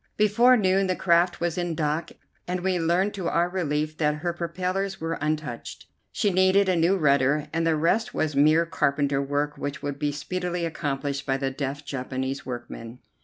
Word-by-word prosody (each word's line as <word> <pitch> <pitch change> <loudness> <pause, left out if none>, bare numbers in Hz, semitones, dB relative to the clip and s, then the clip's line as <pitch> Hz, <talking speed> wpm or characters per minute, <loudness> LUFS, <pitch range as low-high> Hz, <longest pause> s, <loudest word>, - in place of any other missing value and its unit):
Before 235 +5 +5
noon 190 -2 +2
the 185 - 0
craft 175 0 +2
was 170 0 -1
in 175 -2 -2
dock, 155 +1 -1 0.4
and 180 0 -2
we 185 -1 0
learned 175 +5 +1
to 190 -4 -2
our 170 +1 +2
relief 155 -4 -2
that 150 -1 +2
her 170 +3 -2
propellers 185 +3 -3
were 165 0 -3
untouched. 155 -5 -4 0.3
She 205 - +1
needed 190 +2 +4
a 185 - +3
new 170 +4 +3
rudder, 140 -2 +2
and 165 0 +1
the 160 - +3
rest 170 +9 +1
was 155 -2 -1
mere 155 +4 +5
carpenter 140 -3 0
work 145 +1 -2
which 145 0 -4
would 140 -1 -4
be 150 -1 0
speedily 175 +4 -3
accomplished 140 -3 -3
by 135 0 +1
the 135 -1 -2
deft 140 +1 -4
Japanese 130 0 -4
workmen. 120 -1 -7
160 Hz, 180 wpm, -25 LUFS, 145-180 Hz, 0.4 s, Before